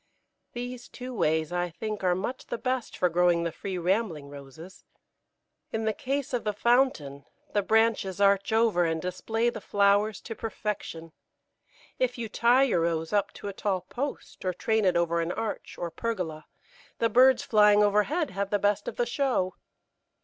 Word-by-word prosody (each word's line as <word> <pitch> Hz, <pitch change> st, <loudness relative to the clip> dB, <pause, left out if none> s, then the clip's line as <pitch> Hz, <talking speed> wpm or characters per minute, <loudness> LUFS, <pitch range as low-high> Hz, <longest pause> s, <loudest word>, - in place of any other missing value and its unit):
These 245 Hz, 0 st, -6 dB
two 255 Hz, 0 st, -8 dB
ways 160 Hz, -6 st, +1 dB
I 175 Hz, 0 st, -1 dB
think 210 Hz, +4 st, -5 dB
are 180 Hz, -1 st, +3 dB
much 220 Hz, +8 st, -4 dB
the -, -, -3 dB
best 255 Hz, 0 st, -3 dB
for 180 Hz, -, +3 dB
growing 175 Hz, 0 st, +2 dB
the 170 Hz, -, -1 dB
free, 190 Hz, +3 st, -5 dB
rambling 175 Hz, -5 st, -1 dB
Roses. 145 Hz, +6 st, -12 dB, 0.9 s
In 220 Hz, 0 st, -2 dB
the 220 Hz, -, +1 dB
case 270 Hz, +3 st, -3 dB
of 245 Hz, -, 0 dB
the 210 Hz, -, -1 dB
fountain, 210 Hz, -, +1 dB, 0.3 s
the 205 Hz, -, +3 dB
branches 220 Hz, -2 st, +1 dB
arch 200 Hz, +1 st, +3 dB
over 220 Hz, -5 st, +3 dB
and 165 Hz, -1 st, 0 dB
display 225 Hz, +7 st, -1 dB
the 220 Hz, -, -8 dB
flowers 205 Hz, +2 st, +2 dB
to 225 Hz, -, -6 dB
perfection; 210 Hz, -7 st, -5 dB, 0.9 s
if 250 Hz, -1 st, 0 dB
you 235 Hz, -1 st, -3 dB
tie 240 Hz, +5 st, +4 dB
your 230 Hz, -11 st, +2 dB
Rose 165 Hz, +1 st, -1 dB
up 205 Hz, -1 st, +1 dB
to -, -, -8 dB
a 200 Hz, -, -4 dB
tall 190 Hz, -2 st, -1 dB
post 270 Hz, -, -6 dB
or 185 Hz, -1 st, -1 dB
train 220 Hz, +2 st, +1 dB
it 180 Hz, -2 st, +3 dB
over 170 Hz, 0 st, +1 dB
an 165 Hz, +1 st, -2 dB
arch 220 Hz, +2 st, -4 dB
or 170 Hz, -1 st, -4 dB
pergola, 175 Hz, -7 st, -4 dB, 0.5 s
the 230 Hz, -, +2 dB
birds 255 Hz, +2 st, +5 dB
flying 210 Hz, -1 st, +5 dB
overhead 210 Hz, -, +1 dB
have 195 Hz, +1 st, -2 dB
the 205 Hz, -, +2 dB
best 205 Hz, 0 st, 0 dB
of -, -, -4 dB
the 240 Hz, -, 0 dB
show. 240 Hz, -7 st, 0 dB
205 Hz, 175 wpm, -27 LUFS, 175-230 Hz, 0.9 s, birds